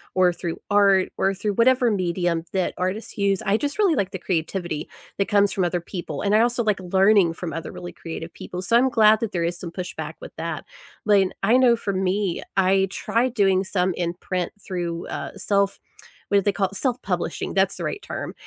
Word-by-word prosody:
or 180 -1 +4
through 170 -1 -5
art 200 -2 +4
or 195 0 +2
through 205 +2 -2
whatever 250 +3 +4
medium 175 -4 0
that 190 -2 0
artists 185 +6 -3
use, 200 -2 +1
I 195 - +3
just, 290 - -2
really 385 -7 +4
like 195 -4 -1
the 190 - -5
creativity 175 -2 -2 0.3
that 200 - +1
comes 205 -1 +3
from 190 - 0
other 175 0 0
people, 170 -5 -6
and 205 +1 +2
I 220 - +5
also 240 +1 +2
like 210 -4 +1
learning 190 0 +4
from 170 -4 -5
other 165 +1 -5
really 175 0 -8
creative 165 0 -7
people. 180 0 -7
So, 210 +5 +1
I'm 260 +2 +4
glad 220 -2 +5
that 220 -2 -2
there 170 -2 -1
is 175 0 -2
some 170 -1 -7
pushback 160 -4 -6
with - - -11
that 165 +1 -4 0.4
lane. 200 -3 +4
I 220 +5 +4
know 250 -2 +5
for 200 -3 -3
me, 190 0 0
I 190 0 +4
tried 240 +4 0
doing 195 -4 +3
some 185 -2 0
in 170 -1 -2
print 180 0 -3
through, 175 -3 -4
uh, - - -6
self 200 0 +1 0.5
what 200 - +4
do - - 0
they 205 - +2
call 195 -2 0
it? 195 - -11
Self-publishing, 250 +3 -2
that's - - +2
the - - -5
right 410 - -3
term, - - -6
195 Hz, 210 wpm, -23 LUFS, 175-210 Hz, 0.5 s, I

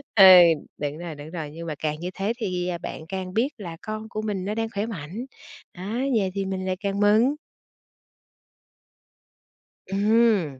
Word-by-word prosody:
Ừ, 200 - +8 0.5
đúng 145 0 -3
rồi, 170 -2 -6
đúng 145 +1 -9
rồi, 160 -4 -5
nhưng 165 +2 -8
mà 155 - -3
càng 150 -1 -2
như 175 +2 -4
thế 200 +5 -1
thì, 180 -6 -2
à, 180 -1 -2
bạn 160 -2 -7
càng 185 0 -5
biết 235 +7 +2
là 170 -6 -7
con 215 0 -6
của 215 -2 -4
mình 205 -4 -3
nó 210 +2 -2
đang 225 0 -1
khỏe 205 -1 -2
mạnh, 200 - -6 0.5
á, 200 +7 -4 0.2
vậy 195 -3 0
thì 195 0 -2
mình 190 -1 -3
lại 185 0 0
càng 200 0 -2
mừng. 215 +7 +4 2.5
Ừm, 200 - +2
195 Hz, 175 wpm, -25 LUFS, 170-215 Hz, 2.5 s, Ừ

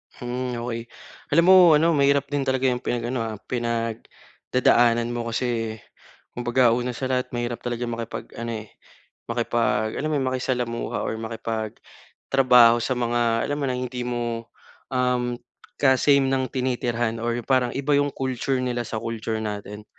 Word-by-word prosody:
Hmm, 125 0 -4
okey. 115 -1 -4 0.5
Alam 170 - +6
mo - - +9 0.2
ano 165 +3 +4
mahirap 140 -1 +3
din 145 -1 0
talaga 130 0 0
yung 125 - -2
pinag-ano, 120 0 -2
ah, 110 - -5
pinagdadaanan 120 0 0
mo. 120 -1 -3
Kasi, 115 -2 -2 0.6
kumbaga 120 0 +2
una 125 0 -1
sa 130 +1 -3
lahat 125 0 0
mahirap 120 0 -3
talaga 120 0 -3
makipag 115 -1 -6
ano, 115 -2 -4
eh, - - -18 0.6
makipag 115 -2 0
alam 155 - -1
mo 150 - +1
yun, 130 - -1
makisalamuha 125 -2 -2
or - - -2
makipagtrabaho 115 +2 +1
sa 130 - 0
mga 120 -1 +1
alam 145 - -1
mo 140 - -1
ng 125 0 -1
hindi 125 0 -5
mo, 120 -1 -3 0.5
um, 125 -1 +1 0.4
ka 135 -2 +5
same 140 -2 +4
ng 130 -2 0
tinitirhan 120 -3 -1
or 120 0 -1
parang 130 -2 +2
iba 140 +1 0
yung 145 0 +2
culture 130 0 -1
nila 125 -1 -1
sa 110 - -4
culture 115 -1 -3
natin. 105 0 -6
120 Hz, 155 wpm, -24 LUFS, 115-130 Hz, 0.6 s, mo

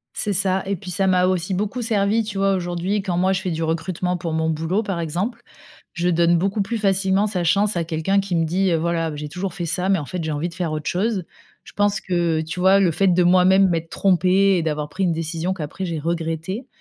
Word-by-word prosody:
C'est 210 - -1
ça, 190 0 +1
et 200 - 0
puis, 180 0 -8
ça 190 +2 0
m'a 180 -1 +3
aussi 185 0 0
beaucoup 210 +6 -2
servi, 220 0 +1
tu 210 -2 -6
vois, 195 0 +2
aujourd'hui, 180 +2 -1
quand 180 -3 -2
moi 185 +2 +2
je 190 - -1
fais 190 - -3
du 165 0 -2
recrutement 170 +3 -1
pour 170 -1 -4
mon 160 0 0
boulot, 165 +7 -1
par 195 -5 -3
exemple, 180 +9 -3 0.5
je 175 0 -1
donne 170 0 +3
beaucoup 195 +4 0
plus 230 +4 -2
facilement 195 -1 +2
sa 195 -4 -2
chance 200 +4 +2
à 170 - 0
quelqu'un 165 +5 0
qui 195 -2 -2
me 165 -1 +2
dit: 180 +3 +1
«Voilà, 165 -1 -1
j'ai 150 0 -5
toujours 180 +2 -4
fait 175 - -3
ça, 180 +3 -1
mais 195 - +4
en 145 - -5
fait, 175 +4 -5
j'ai 160 - -2
envie 150 +4 -2
de - - -13
faire 170 -2 -3
autre 155 -1 -4
chose». 195 +1 -1 0.4
Je - - -15
pense 205 -1 +1
que, 170 -3 0
tu 165 +3 -6
vois, 190 +2 +5
le 185 -4 +3
fait 195 +5 +1
de 180 0 +4
moi-même 185 +2 +5
m'être 165 -1 -2
trompée 190 +1 +3
et - - +1
d'avoir 150 -2 -2
pris 190 +5 -3
une 175 - +1
décision 165 +2 -2
qu'après 185 +2 -5
j'ai 170 -2 -3
regrettée, 165 - -3
180 Hz, 245 wpm, -22 LUFS, 165-195 Hz, 0.5 s, vois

